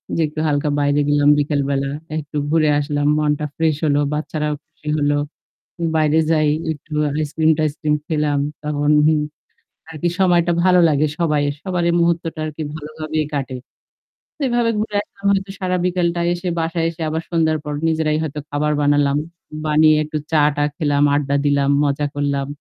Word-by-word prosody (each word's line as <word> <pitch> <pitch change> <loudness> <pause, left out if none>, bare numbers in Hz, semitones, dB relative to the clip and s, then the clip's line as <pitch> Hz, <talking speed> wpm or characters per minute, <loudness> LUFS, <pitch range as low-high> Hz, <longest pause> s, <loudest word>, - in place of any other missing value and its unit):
যে 165 - +1
একটু 155 +1 -7
হালকা 145 0 0
বাইরে 145 0 +2
গেলাম 145 0 +4
বিকেল 145 0 0
বেলা। 135 0 0 0.3
একটু 150 0 -5
ঘুরে 155 -1 +3
আসলাম। 145 0 -1
মনটা 150 0 0
ফ্রেশ 160 -2 +1
হল। 145 -1 +2 0.2
বাচ্চারাও 150 0 -2
খুশি 150 - -18
হল। 145 0 +1 0.8
বাইরে 155 0 +3
যাই 155 -1 +3 0.2
একটু 155 +1 -10 0.2
আইসক্রিম-টাইসক্রিম 155 0 +1
খেলাম। 150 -3 0 0.2
তখন 145 0 -1 0.2
হুম 155 -1 +4 0.7
আর 160 - -9
কি 175 - +2
সময়টা 175 -2 +3
ভালো 180 -1 +5
লাগে 150 0 +2
সবাই 150 -4 +1 0.2
সবার 180 -2 -2
এই 170 - +2
মুহূর্তটা 170 -1 0
আরকি 155 0 -5
ভালোভাবে 155 0 -5 0.2
কাটে। 135 -2 -3 0.8
তো - - -13
এভাবে 240 -1 +2
ঘুরে 210 -1 -3
আসলাম 200 - -16
হয়তো 195 0 0
সারা 185 -1 -1
বিকেলটা 175 -1 0
এসে 175 +1 -5
বাসায় 165 0 -1
এসে 165 0 -9
আবার 160 +1 -2
সন্ধ্যার 160 -2 +1
পর 150 - -4
নিজেরাই 155 -1 +1
হয়তো 150 -1 -4
খাবার 150 +1 0
বানালাম। 145 -1 +2 0.5
বানিয়ে 155 0 +5
একটু 155 0 -4
চা-টা 150 -1 +3
খেলাম, 145 -3 +1
আড্ডা 140 -1 0
দিলাম, 140 -1 +2
মজা 145 +1 0
করলাম। 140 -1 -1
155 Hz, 160 wpm, -20 LUFS, 145-165 Hz, 0.8 s, ভালো